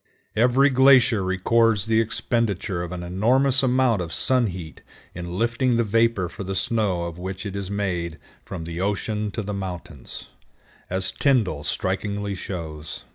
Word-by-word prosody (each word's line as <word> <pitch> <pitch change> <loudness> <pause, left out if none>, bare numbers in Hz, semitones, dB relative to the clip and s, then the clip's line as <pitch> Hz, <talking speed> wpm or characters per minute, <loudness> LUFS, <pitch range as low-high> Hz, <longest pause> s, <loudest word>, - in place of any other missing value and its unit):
Every 125 +5 +4
glacier 130 -4 +5
records 105 +3 +2
the 110 0 +3
expenditure 110 -4 -1
of 85 0 -5
an 90 -1 -5
enormous 125 +9 +2
amount 130 -5 +2
of 85 -2 -5
sun 125 +3 +2
heat 90 -4 -7 0.3
in 85 +1 -6
lifting 120 +2 +1
the 120 - +3
vapor 115 -3 +2
for 100 +4 -8
the 95 0 -4
snow 105 -7 0
of 85 0 -6
which 95 +2 -5
it 100 -1 -5
is 100 -2 -4
made 90 -5 -2 0.3
from 90 -4 -6
the 85 +2 -5
ocean 105 +2 -1
to 110 +2 -4
the 105 +1 -4
mountains, 90 -7 -7 0.6
as 95 +1 0
Tyndall 110 - +1
strikingly 100 +3 -2
shows. 80 -5 -6
100 Hz, 155 wpm, -24 LUFS, 90-115 Hz, 0.6 s, glacier